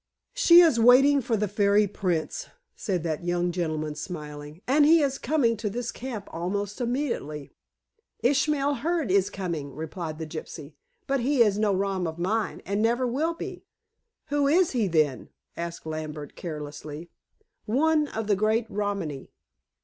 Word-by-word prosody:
"She 355 Hz, -9 st, +7 dB
is 320 Hz, -9 st, +4 dB
waiting 270 Hz, +4 st, +6 dB
for 230 Hz, -2 st, 0 dB
the 210 Hz, +1 st, 0 dB
fairy 205 Hz, +1 st, +3 dB
prince," 180 Hz, -5 st, -2 dB, 0.3 s
said 185 Hz, -7 st, -2 dB
that 160 Hz, -1 st, -2 dB
young 175 Hz, 0 st, 0 dB
gentleman 155 Hz, -3 st, -2 dB
smiling. 150 Hz, 0 st, -8 dB
"And 285 Hz, +4 st, +4 dB
he 320 Hz, +1 st, +6 dB
is 270 Hz, -1 st, -1 dB
coming 245 Hz, -4 st, +2 dB
to 210 Hz, 0 st, -2 dB
this 235 Hz, +3 st, -4 dB
camp 235 Hz, -5 st, -6 dB
almost 200 Hz, +6 st, -3 dB
immediately." 235 Hz, -, -3 dB, 0.7 s
"Ishmael 285 Hz, +1 st, +2 dB
Hearne 315 Hz, -, -1 dB
is 195 Hz, 0 st, +3 dB
coming," 170 Hz, -8 st, -5 dB
replied 160 Hz, +1 st, -5 dB
the 160 Hz, -, -5 dB
gypsy. 155 Hz, -1 st, -8 dB, 0.3 s
"But 275 Hz, 0 st, 0 dB
he 255 Hz, 0 st, +4 dB
is 210 Hz, -2 st, +1 dB
no 215 Hz, -1 st, +2 dB
rom 190 Hz, -2 st, -1 dB
of 160 Hz, 0 st, -5 dB
mine, 210 Hz, +6 st, -1 dB
and 200 Hz, +2 st, -1 dB
never 240 Hz, +3 st, +2 dB
will 300 Hz, +8 st, 0 dB
be." -, -, -7 dB, 0.7 s
"Who 285 Hz, -1 st, +2 dB
is 345 Hz, +4 st, +3 dB
he, 230 Hz, -6 st, +1 dB
then?" 155 Hz, -6 st, +1 dB, 0.3 s
asked 170 Hz, -1 st, -6 dB
Lambert 155 Hz, -2 st, -6 dB
carelessly. 150 Hz, 0 st, -7 dB, 0.6 s
"One 300 Hz, +6 st, +2 dB
of 225 Hz, -5 st, -4 dB
the 205 Hz, -1 st, +2 dB
great 215 Hz, +3 st, +1 dB
Romany." 200 Hz, -9 st, -3 dB
205 Hz, 155 wpm, -26 LUFS, 165-255 Hz, 0.7 s, She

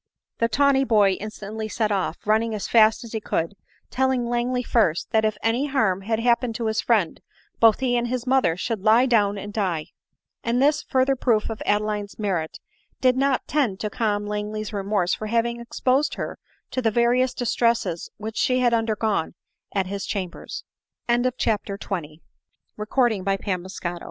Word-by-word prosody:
The 230 Hz, -, +3 dB
tawny 275 Hz, +3 st, +3 dB
boy 210 Hz, -6 st, +4 dB
instantly 215 Hz, +1 st, -6 dB
set 215 Hz, -1 st, 0 dB
off, 190 Hz, -4 st, -1 dB
running 220 Hz, +1 st, +2 dB
as 205 Hz, -, -4 dB
fast 220 Hz, 0 st, +4 dB
as 230 Hz, -, -10 dB
he 220 Hz, -, -2 dB
could, 165 Hz, -2 st, -1 dB, 0.4 s
telling 260 Hz, -1 st, +1 dB
Langley 240 Hz, +1 st, -1 dB
first, 205 Hz, -10 st, +1 dB
that 220 Hz, 0 st, +3 dB
if 215 Hz, -1 st, 0 dB
any 240 Hz, +6 st, +1 dB
harm 220 Hz, -9 st, +1 dB
had 220 Hz, +3 st, -1 dB
happened 235 Hz, 0 st, +1 dB
to 230 Hz, -, -3 dB
his 220 Hz, 0 st, 0 dB
friend, 210 Hz, -9 st, +1 dB, 0.4 s
both 225 Hz, +2 st, +5 dB
he 250 Hz, -2 st, +1 dB
and 240 Hz, 0 st, +1 dB
his 250 Hz, 0 st, -3 dB
mother 255 Hz, -11 st, +2 dB
should 225 Hz, +1 st, -3 dB
lie 220 Hz, +5 st, +5 dB
down 205 Hz, -5 st, +2 dB
and 205 Hz, +1 st, -7 dB
die. 180 Hz, -7 st, -1 dB, 0.5 s
And 235 Hz, +1 st, +1 dB
this 295 Hz, +2 st, +3 dB
further 265 Hz, -1 st, +1 dB
proof 230 Hz, -4 st, +1 dB
of 220 Hz, -, -7 dB
Adeline's 210 Hz, -1 st, -1 dB
merit 185 Hz, -7 st, -2 dB, 0.4 s
did 255 Hz, -1 st, +3 dB
not 270 Hz, 0 st, +1 dB
tend 250 Hz, -10 st, 0 dB
to 210 Hz, -, -2 dB
calm 205 Hz, -2 st, -1 dB
Langley's 210 Hz, +1 st, -4 dB
remorse 195 Hz, -2 st, 0 dB
for 215 Hz, -, -3 dB
having 235 Hz, +1 st, 0 dB
exposed 255 Hz, +4 st, 0 dB
her -, -, -5 dB, 0.3 s
to 255 Hz, -, -1 dB
the 230 Hz, -, +2 dB
various 240 Hz, +3 st, +2 dB
distresses 230 Hz, -7 st, 0 dB
which 220 Hz, +2 st, -6 dB
she 255 Hz, 0 st, +2 dB
bad 245 Hz, -2 st, +3 dB
undergon 220 Hz, -6 st, 0 dB
225 Hz, 150 wpm, -24 LUFS, 210-245 Hz, 0.5 s, both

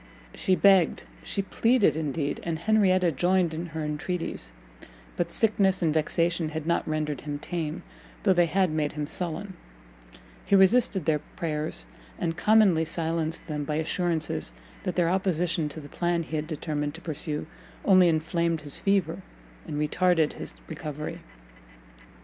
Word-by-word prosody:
She 185 Hz, -, +1 dB
begged, 190 Hz, -4 st, +4 dB, 0.2 s
she 200 Hz, -, -2 dB
pleaded, 230 Hz, +1 st, +3 dB
indeed, 150 Hz, -1 st, -2 dB
and 165 Hz, -1 st, -2 dB
Henrietta 185 Hz, -2 st, +3 dB
joined 180 Hz, +2 st, +2 dB
in 165 Hz, +2 st, -4 dB
her 160 Hz, -1 st, -5 dB
entreaties; 150 Hz, -, -3 dB, 0.6 s
but 170 Hz, -1 st, -1 dB
sickness 195 Hz, -2 st, +2 dB
and 160 Hz, -2 st, +2 dB
vexation 165 Hz, +1 st, +1 dB
had 155 Hz, -1 st, -5 dB
not 170 Hz, +1 st, 0 dB
rendered 155 Hz, -3 st, -2 dB
him 145 Hz, -1 st, -4 dB
tame, 160 Hz, 0 st, -4 dB, 0.4 s
though 195 Hz, -, +5 dB
they 175 Hz, -1 st, +3 dB
had 185 Hz, +1 st, +2 dB
made 155 Hz, -1 st, -1 dB
him 150 Hz, 0 st, -3 dB
sullen: 180 Hz, +5 st, -5 dB, 0.9 s
he 200 Hz, -, +3 dB
resisted 195 Hz, -2 st, +4 dB
their 155 Hz, -2 st, +2 dB, 0.2 s
prayers, 155 Hz, -3 st, -2 dB, 0.3 s
and 165 Hz, -1 st, -2 dB
commonly 210 Hz, -5 st, +4 dB
silenced 165 Hz, 0 st, -1 dB
them 150 Hz, -2 st, -3 dB
by 150 Hz, +1 st, -2 dB
assurances 160 Hz, -, -1 dB, 0.3 s
that 180 Hz, -, -3 dB
their 175 Hz, -2 st, +2 dB
opposition 175 Hz, -3 st, 0 dB
to 155 Hz, -, -7 dB
the 145 Hz, -, -10 dB
plan 175 Hz, +1 st, -1 dB
he 160 Hz, -, -6 dB
had 155 Hz, 0 st, -2 dB
determined 150 Hz, -2 st, -3 dB
to 165 Hz, -, -9 dB
pursue, 150 Hz, -2 st, -2 dB, 0.4 s
only 185 Hz, -3 st, +6 dB
inflamed 165 Hz, +1 st, 0 dB
his 145 Hz, -1 st, -3 dB
fever, 195 Hz, -5 st, +1 dB, 0.5 s
and 150 Hz, -, -4 dB
retarded 160 Hz, +1 st, +2 dB
his -, -, -8 dB
recovery. 150 Hz, 0 st, -6 dB
165 Hz, 150 wpm, -27 LUFS, 155-185 Hz, 0.9 s, only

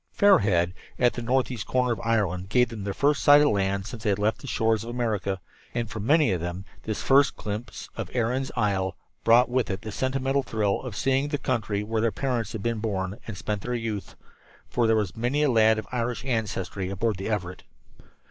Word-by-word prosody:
Fair 200 Hz, 0 st, +6 dB
Head, 90 Hz, -3 st, +1 dB, 0.2 s
at 125 Hz, -1 st, +3 dB
the 120 Hz, -, -5 dB
northeast 125 Hz, -2 st, 0 dB
corner 125 Hz, -1 st, +2 dB
of -, -, -6 dB
Ireland, 95 Hz, -5 st, 0 dB
gave 125 Hz, +3 st, +3 dB
them 110 Hz, -4 st, -6 dB
their 100 Hz, -, -1 dB
first 145 Hz, 0 st, +2 dB
sight 145 Hz, 0 st, +8 dB
of 150 Hz, -, +4 dB
land 100 Hz, -1 st, 0 dB
since 115 Hz, 0 st, -7 dB
they 110 Hz, -, 0 dB
had 100 Hz, -, +2 dB
left 105 Hz, +2 st, 0 dB
the 140 Hz, -, -9 dB
shores 110 Hz, -2 st, +1 dB
of 115 Hz, -, -7 dB
America; 110 Hz, -5 st, -1 dB, 0.4 s
and 120 Hz, -1 st, -1 dB
for 110 Hz, -, -5 dB
many 140 Hz, +3 st, +3 dB
of 90 Hz, -3 st, -1 dB
them 90 Hz, +2 st, -4 dB, 0.2 s
this 105 Hz, -4 st, -3 dB
first 140 Hz, 0 st, +4 dB
glimpse 105 Hz, +3 st, -6 dB
of 110 Hz, -5 st, -5 dB
Erin's 125 Hz, +3 st, 0 dB
Isle 100 Hz, -4 st, 0 dB, 0.3 s
brought 120 Hz, +2 st, +6 dB
with 125 Hz, 0 st, 0 dB
it 95 Hz, 0 st, -3 dB
the 110 Hz, -, -5 dB
sentimental 135 Hz, +3 st, 0 dB
thrill 110 Hz, -5 st, -1 dB
of 125 Hz, -6 st, -7 dB
seeing 135 Hz, +4 st, +1 dB
the 145 Hz, 0 st, -1 dB
country 110 Hz, -7 st, -1 dB
where 110 Hz, +1 st, -1 dB
their 115 Hz, 0 st, +2 dB
parents 115 Hz, 0 st, -2 dB
had 110 Hz, -3 st, -5 dB
been 115 Hz, -1 st, -1 dB
born 100 Hz, -1 st, -3 dB
and 105 Hz, -4 st, -6 dB
spent 105 Hz, +2 st, -3 dB
their 125 Hz, +3 st, -3 dB
youth 110 Hz, -4 st, -4 dB, 0.5 s
for 120 Hz, -2 st, +1 dB
there 110 Hz, -, +4 dB
was 105 Hz, -5 st, -1 dB
many 125 Hz, +6 st, 0 dB
a 145 Hz, -, +3 dB
lad 110 Hz, -1 st, +5 dB
of 110 Hz, -, -4 dB
Irish 120 Hz, 0 st, -2 dB
ancestry 100 Hz, -6 st, -2 dB
aboard 100 Hz, +2 st, -1 dB
the 95 Hz, +3 st, -4 dB
Everett. 90 Hz, -4 st, -3 dB
110 Hz, 215 wpm, -26 LUFS, 100-125 Hz, 0.5 s, sight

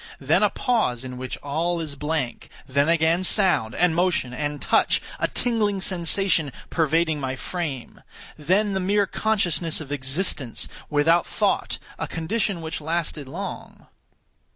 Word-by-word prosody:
Then -, -, +2 dB
a -, -, +4 dB
pause 215 Hz, -, 0 dB
in 125 Hz, -1 st, -7 dB
which 130 Hz, -1 st, -5 dB
all 165 Hz, +5 st, -1 dB
is 155 Hz, -3 st, -3 dB
blank. 150 Hz, -2 st, -3 dB, 0.2 s
Then 140 Hz, +3 st, +1 dB
again 170 Hz, +2 st, +2 dB
sound, 185 Hz, -, +4 dB
and 180 Hz, -2 st, +3 dB
motion, 170 Hz, -8 st, +1 dB
and 145 Hz, +2 st, -3 dB
touch—a -, -, +1 dB
tingling 215 Hz, -5 st, 0 dB
sensation 180 Hz, -4 st, +3 dB, 0.2 s
pervading 160 Hz, -1 st, +1 dB
my 130 Hz, -1 st, -3 dB
frame. 145 Hz, -3 st, -5 dB, 0.3 s
Then 190 Hz, +7 st, +1 dB
the 190 Hz, -, 0 dB
mere 200 Hz, +2 st, +2 dB
consciousness 180 Hz, -6 st, 0 dB
of 145 Hz, -3 st, -8 dB
existence, 135 Hz, -1 st, 0 dB, 0.2 s
without 160 Hz, +3 st, +3 dB
thought—a -, -, -2 dB
condition 195 Hz, +2 st, -2 dB
which 160 Hz, 0 st, -5 dB
lasted 160 Hz, -2 st, -2 dB
long. 180 Hz, +7 st, -7 dB
165 Hz, 130 wpm, -24 LUFS, 145-185 Hz, 0.3 s, a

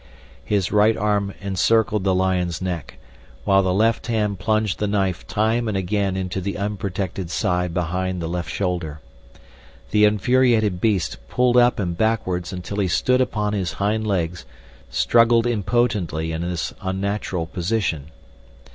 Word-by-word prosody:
His 100 Hz, -3 st, 0 dB
right 105 Hz, +1 st, +4 dB
arm 105 Hz, -1 st, 0 dB
encircled 105 Hz, +2 st, +1 dB
the 95 Hz, -1 st, +3 dB
lion's 90 Hz, -2 st, 0 dB
neck, 90 Hz, -5 st, -4 dB, 0.5 s
while 95 Hz, 0 st, +4 dB
the 95 Hz, -1 st, 0 dB
left 110 Hz, +5 st, +1 dB
hand 105 Hz, -4 st, 0 dB
plunged 110 Hz, -2 st, 0 dB
the 105 Hz, -, 0 dB
knife 95 Hz, -3 st, -1 dB
time 110 Hz, +2 st, +1 dB
and 105 Hz, -3 st, -1 dB
again 95 Hz, 0 st, -1 dB
into 95 Hz, 0 st, -3 dB
the 100 Hz, +2 st, -3 dB
unprotected 100 Hz, -2 st, -3 dB
side 90 Hz, 0 st, 0 dB
behind 90 Hz, +2 st, -2 dB
the 85 Hz, -, -3 dB
left 85 Hz, -1 st, -3 dB
shoulder. 85 Hz, -6 st, -2 dB, 0.9 s
The 105 Hz, 0 st, +5 dB
infuriated 110 Hz, -2 st, +2 dB
beast, 100 Hz, -7 st, +1 dB
pulled 125 Hz, -1 st, +2 dB
up 120 Hz, 0 st, +5 dB
and 90 Hz, -4 st, -2 dB
backwards 95 Hz, -4 st, 0 dB
until 90 Hz, +2 st, -6 dB
he 100 Hz, -, +2 dB
stood 125 Hz, +8 st, +2 dB
upon 105 Hz, -4 st, -1 dB
his 95 Hz, -4 st, -2 dB
hind 110 Hz, +2 st, -1 dB
legs, 90 Hz, -3 st, -1 dB, 0.5 s
struggled 115 Hz, -, +4 dB
impotently 105 Hz, -8 st, 0 dB
in 80 Hz, 0 st, -3 dB
this 85 Hz, -1 st, -3 dB
unnatural 95 Hz, -2 st, -2 dB
position. 85 Hz, -4 st, -2 dB
100 Hz, 145 wpm, -22 LUFS, 90-110 Hz, 0.9 s, The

